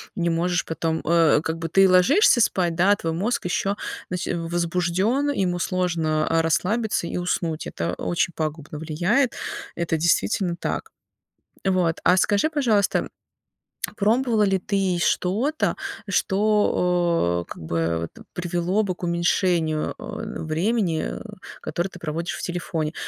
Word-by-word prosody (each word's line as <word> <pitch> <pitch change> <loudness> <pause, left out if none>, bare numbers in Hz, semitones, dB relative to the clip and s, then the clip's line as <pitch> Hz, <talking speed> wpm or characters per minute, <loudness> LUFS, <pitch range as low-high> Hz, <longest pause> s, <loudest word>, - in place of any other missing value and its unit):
не 170 -2 0
можешь 170 +1 0
потом 160 0 -2
э, 165 -3 +4
как 160 +1 -3
бы, 165 0 -4
ты 195 +3 +5
ложишься 240 - +5
спать, 175 -6 +1
да, 195 +4 +4
твой 165 -4 -3
мозг 200 +5 -1
ещё 195 +3 0 0.3
нач 180 0 -3
возбуждён, 175 +10 0
ему 185 -8 0
сложно, 165 -4 0
э, 165 0 +3
расслабиться 185 +4 0
и - - -4
уснуть. 170 -2 -2
Это 85 - -3
очень 175 -1 -1
пагубно 155 -1 -4
влияет, 180 - +1 0.4
это 165 -1 -1
действительно 170 - +1
так. - - -4 0.8
Вот, 180 -4 +1
а 180 +1 +5
скажи, 205 +10 +2
пожалуйста, 235 -10 +1 0.9
пробовала 225 +1 +2
ли 195 -1 +2
ты 190 -2 0
что-то, 225 - +1 0.3
что, 190 0 +1 0.4
о 170 - +1
как - - -9
бы, 85 0 -1
т - - -13
привело 175 +3 0
бы 185 - -2
к - - -21
уменьшению, 170 -2 +1
э, - - -6
времени, 170 +1 0 0.5
которое 175 +2 -2
ты 175 - -11
проводишь 165 +1 -3
в - - -7
телефоне? 165 -3 -3
175 Hz, 135 wpm, -24 LUFS, 165-195 Hz, 0.9 s, ты